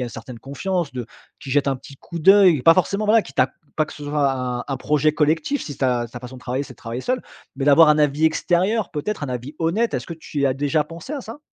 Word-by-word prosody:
y - - -1
a - - -4
une - - -6
certaine 120 +2 -9
confiance, 155 +5 -3
de 125 -2 -4 0.4
qui 135 - -8
jette 140 +1 +2
un 135 - 0
petit 140 +1 -14
coup 170 +4 -8
d'œil. 185 -5 +6
Pas 165 - +8
forcément, 200 +4 0
voilà, 220 +2 +5
qui 135 -8 -12
ta 130 0 +2 0.3
pas 155 - +2
que - - -11
ce 145 - -11
soit 145 -2 +1
un 125 -1 -3
un 135 - -2
projet 150 +2 +2
collectif 160 - 0
si 145 - -7
ta 125 -3 0
ta 120 - -8
façon 130 +1 -9
de - - -13
travailler, 130 +2 -2
c'est - - -11
de - - -20
travailler 115 +2 -6
seul, 255 0 -1 0.3
mais 135 +1 -3
d'avoir 150 +2 +7
un 150 - +3
avis 150 +1 +2
extérieur, 185 +7 +1
peut-être 155 +2 -3
un - - -5
avis 125 +4 -5
honnête. 195 +9 0
Est-ce - - -3
que 170 - -6
tu 155 -2 -8
y 140 - +3
as 130 - +1
déjà 145 +2 0
pensé 170 - -9
à 285 - -3
ça? 230 +5 -9
150 Hz, 275 wpm, -22 LUFS, 130-170 Hz, 0.4 s, Pas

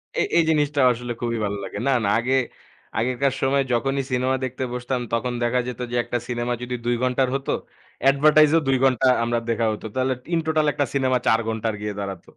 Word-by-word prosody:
এ - - +1 0.2
এই 170 - +5
জিনিসটা 145 -2 +2
আসলে 120 0 -4
খুবই 115 -1 -1
ভালো 100 0 -3
লাগে। - - -6
না, - - +3
না - - +2
আগে, 130 +3 0 0.6
আগেকার 130 +3 0
সময়ে 135 +1 +2
যখনই 135 +3 0
সিনেমা 130 +1 +1
দেখতে 130 0 -3
বসতাম 125 +1 -2
তখন 120 +2 0
দেখা 120 +1 +1
যেত 125 -1 -6
যে, - - -2
একটা 120 0 -2
সিনেমা 120 0 -2
যদি 125 0 -3
২ 120 - +2
ঘণ্টার 130 +1 +2
হতো, 135 - -2 0.5
অ্যাডভেরটাইজ 150 +2 +5
ও - - +5
২ 135 -1 +3
ঘণ্টা 130 -1 +3 0.2
আমরা 120 0 0
দেখা 115 0 +1
হতো। 105 - -8
তাহলে 130 0 +1 0.2
ইন 170 - +3
টোটাল, 155 -1 +2
একটা 145 - 0
সিনেমা 130 -2 +2
৪ 115 - +4
ঘণ্টার 110 0 -2
গিয়ে 105 0 -3
দাঁড়াত। 100 -3 -5
125 Hz, 205 wpm, -23 LUFS, 120-135 Hz, 0.6 s, এই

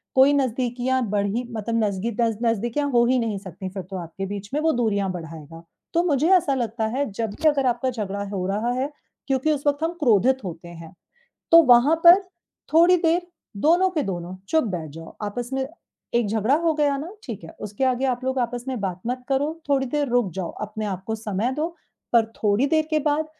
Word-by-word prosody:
कोई 265 +2 +6
नज़दीकियाँ 255 -1 0
बढ़ीं, 205 +4 -1
मतलब 230 +1 -1
नज़गी 205 +2 -1
दज़ 225 -2 +1
नज़दीकियाँ 235 +6 0
हो 240 -1 +4
ही 255 +1 +3
नहीं 225 -4 -1
सकतीं, 190 0 -7
फिर 190 0 -6
तो 190 +2 -7
आपके 175 +2 -6
बीच 200 +1 -6
में। 300 - 0
वो 320 +1 +3
दूरियाँ 205 -5 0
बढ़ाएगा, 165 -2 -9 0.3
तो 340 0 +3
मुझे 310 -1 +2
ऐसा 310 -5 0
लगता 230 -2 -2
है, 285 - +1
जब 220 +2 -3
भी 315 - +1
अगर 280 -3 0
आपका 245 +1 +1
झगड़ा 200 -4 -4
हो 185 -2 -2
रहा 210 +5 -1
है, 275 +3 -2 0.4
क्योंकि 270 +3 +1
उस 290 -1 -2
वक़्त 290 +2 +1
हम 330 +1 0
क्रोधित 260 0 +3
होते 170 -2 -7
हैं, 165 -1 -11 0.6
तो 335 0 +9
वहाँ 250 +2 +6
पर 350 +3 +9 0.5
थोड़ी 340 +3 +6
देर 340 +1 +2 0.4
दोनों 345 - +4
के 320 -5 -1
दोनों 180 -4 -4
चुप 320 -3 +2
बैठ 160 -3 -5
जाओ। 165 +2 -11
आपस 235 +4 -4
में 265 0 -1 0.5
एक 235 -2 +2
झगड़ा 220 +5 +2
हो 335 -1 +2
गया 290 -2 +1
ना, 300 +4 -5 0.2
ठीक 225 -8 -7
है। 165 - -9
उसके 210 +5 -3
आगे 260 0 +1
आप 255 0 -1
लोग 260 0 -1
आपस 245 0 -2
में 255 -4 -3
बात 185 -2 -3
मत 250 +1 -3
करो, 290 +4 -1
थोड़ी 275 -1 +2
देर 290 +2 -1
रुक 240 -5 +1
जाओ, 185 -3 -3
अपने 215 +1 -4
आपको 195 +2 -4
समय 215 +2 -2
दो, 305 +4 -1 0.4
पर 230 -2 +5
थोड़ी 210 +5 +2
देर 315 +1 +2
के 310 - +3
बाद 300 +1 0
240 Hz, 210 wpm, -23 LUFS, 200-280 Hz, 0.6 s, तो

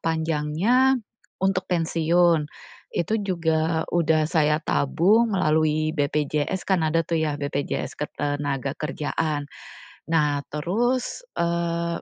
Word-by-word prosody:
panjangnya 165 - +2 0.5
untuk 190 -1 +1
pensiun, 165 -2 +2 0.4
itu 195 +6 -1
juga 160 -3 0
udah 160 -2 +3
saya 150 -2 +2
tabung 210 +11 +2
melalui 155 -3 +2
BPJS 150 +3 -1
kan 190 -3 +3
ada 160 +1 +2
tuh 165 - 0
ya 150 -2 0
BPJS 140 0 -3
Ketenagakerjaan. 145 +1 -2 0.7
Nah, 150 -3 +2
terus, 240 - -1 0.2
eee, 170 0 -1
160 Hz, 95 wpm, -24 LUFS, 150-175 Hz, 0.7 s, udah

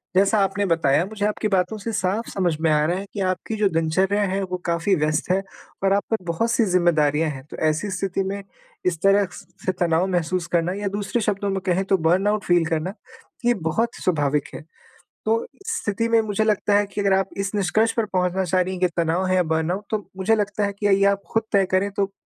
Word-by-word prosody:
जैसा 200 +3 +4
आपने 195 +1 0
बताया 165 -3 +2
मुझे 205 +1 -3
आपकी 210 +1 0
बातों 190 +2 0
से 215 +2 -4
साफ़ 200 +4 -1
समझ 180 -4 0
में 165 - +2
आ 150 0 +3
रहा 175 +3 0
है, 195 - -5
कि 205 - -5
आपकी 185 +3 -1
जो 210 -2 +2
दिनचर्या 185 +5 +1
है 195 0 -1
वो 180 -1 -3
काफ़ी 170 +3 +1
व्यस्त 155 +3 0
है 190 - +2 0.4
और 195 0 +3
आप 200 - +2
पर 225 - +3
बहुत-सी 230 +7 +1
ज़िम्मेदारियाँ 165 -4 +2
हैं, 135 -3 -7
तो - - -7
ऐसी 155 +7 0
स्थिति 190 +1 -1
में 200 +1 -4 0.4
इस 175 -3 +1
तरह 195 +1 +5 0.4
से 185 - +2
तनाव 175 +1 +2
महसूस 175 0 -1
करना 170 +2 +1
या 205 - -1
दूसरे 205 +4 -2
शब्दों 200 -1 -1
में 195 0 -1
कहें 185 +1 +1
तो 195 -1 +2
बर्नआउट 195 +6 +2
फ़ील 175 -2 +3
करना 165 +4 -2 0.5
ये 240 - +5 0.2
बहुत 230 +8 +1
स्वाभाविक 150 -4 +1
है। - - -7 0.6
तो, 225 +1 +2
इस 455 +3 -4
स्थिति 230 +3 -1
में 230 -1 +4
मुझे 215 0 -1
लगता 210 -1 +1
है 205 - +2
कि 200 +1 -4
अगर 200 -1 +2
आप 195 0 +1
इस 195 +1 -2
निष्कर्ष 215 +3 +2
पर 230 - +2
पहुँचना 185 +1 +1
चाह 185 +1 +1
रही 185 +1 -2
हैं 185 - -5
कि, 180 - +5
तनाव 170 +3 +1
है 185 - +2
या 180 - +3
बर्नआउट 160 +5 -1
तो 215 -2 -2
मुझे 205 +4 +2
लगता 205 0 -1
है 200 - -3
कि 205 - +1
ये 195 0 +4
आप 200 0 +2
ख़ुद 225 0 +2
तय 200 -2 +4
करें, 190 +2 +2
तो 195 0 -1
190 Hz, 225 wpm, -23 LUFS, 175-205 Hz, 0.6 s, तरह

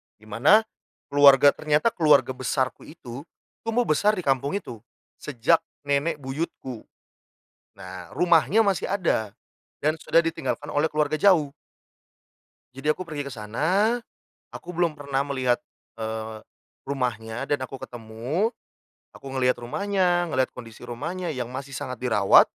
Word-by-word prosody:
dimana 115 - +3 0.5
keluarga 140 0 +7
ternyata 150 +10 +1
keluarga 150 -7 +4
besarku 130 0 -2
itu, 140 -1 -10 0.4
tumbuh 240 +2 +2
besar 210 +5 +2
di 185 - -4
kampung 140 +5 0
itu, 120 - -6 0.4
sejak 145 +4 +2 0.2
nenek 145 +3 +1
buyutku. 135 -3 -6 0.9
Nah, 90 -2 -9
rumahnya 180 +5 +4
masih 195 -5 0
ada, 140 - 0 0.5
dan 155 +1 +1
sudah 165 +1 +3
ditinggalkan 150 -2 -3
oleh 150 +2 +2
keluarga 150 0 0
jauh 170 -8 +4 1.2
jadi 135 +3 -1
aku 185 +3 -8
pergi 150 -3 -4
ke 140 - -7
sana, 170 - 0 0.5
aku 175 - -10
belum 175 -2 0
pernah 140 -2 -2
melihat, 130 -3 +1 0.4
eee, 110 0 -5 0.4
rumahnya 120 -2 -3
dan 145 - +2
aku 135 +1 -10
ketemu. 120 - -3 0.6
Aku 135 - -9
ngelihat 125 -1 +2
rumahnya, 175 +6 0
ngelihat 130 -4 0
kondisi 115 -1 -11
rumahnya 160 +9 -4
yang 125 -4 -4
masih 135 +2 -7
sangat 125 -1 -5
dirawat, 105 -6 +5
140 Hz, 130 wpm, -25 LUFS, 125-165 Hz, 1.2 s, keluarga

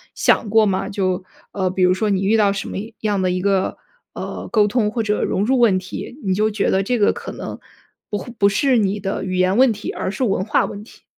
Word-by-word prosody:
想 210 - +2
过 220 0 +5
吗？ 195 0 -1
就， 185 -2 -1 0.3
呃， 190 -2 -1
比 185 0 0
如 180 0 +5
说 210 +3 -1
你 195 -1 +1
遇 215 +3 +3
到 205 -2 +4
什 195 - -4
么 - - -5 0.2
样 205 -3 0
的 185 - +1
一 180 0 -1
个， 195 -1 0 0.4
呃， - - -6
沟 210 -3 +4
通 210 -1 +1
或 230 -1 -1
者 210 0 0
融 200 - 0
入 260 +1 +2
问 215 -6 +4
题， 185 +8 -7
你 190 - +1
就 215 +3 +2
觉 205 -1 0
得 190 - +2
这 245 +5 0
个 205 - +3
可 - - -7
能， - - -7 0.5
不 205 - -2
会 235 +5 -8
不 200 0 +5
是 260 +4 +2
你 205 0 0
的 195 0 -3
语 185 -1 -3
言 185 +1 +2
问 255 +1 +5
题， 210 0 -5
而 - - -3
是 255 - -3
文 195 -4 +1
化 210 - +1
问 205 0 -7
题。 220 - -18
205 Hz, 270 characters per minute, -20 LUFS, 190-215 Hz, 0.5 s, 过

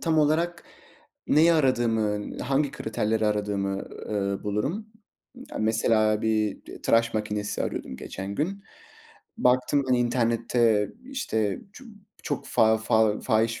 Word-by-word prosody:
tam 160 -2 +1
olarak 165 +3 +1 0.6
neyi 165 +3 +5
aradığımın, 115 -8 +1
hangi 140 +2 0
kriterleri 110 -4 -1
aradığımı, 100 -2 -1 0.3
ııı, 100 -2 -2
bulurum. 135 - -2 0.6
Ya, - - -5
mesela 110 -1 +2
bir 110 -2 0
t - - -11
tıraş 115 0 +2
makinesi 105 -1 -2
arıyordum 65 - -4
geçen 95 +8 -6
gün. 195 - -3 0.7
Baktım 130 +3 +2
ben 130 - +4
internette, 115 -2 +2
işte, 110 - -2
ço 255 - -13 0.4
çok 145 - -3
fa 110 0 +4
fa 110 -1 +2
fahiş 115 -1 +1
110 Hz, 120 wpm, -26 LUFS, 105-135 Hz, 0.7 s, neyi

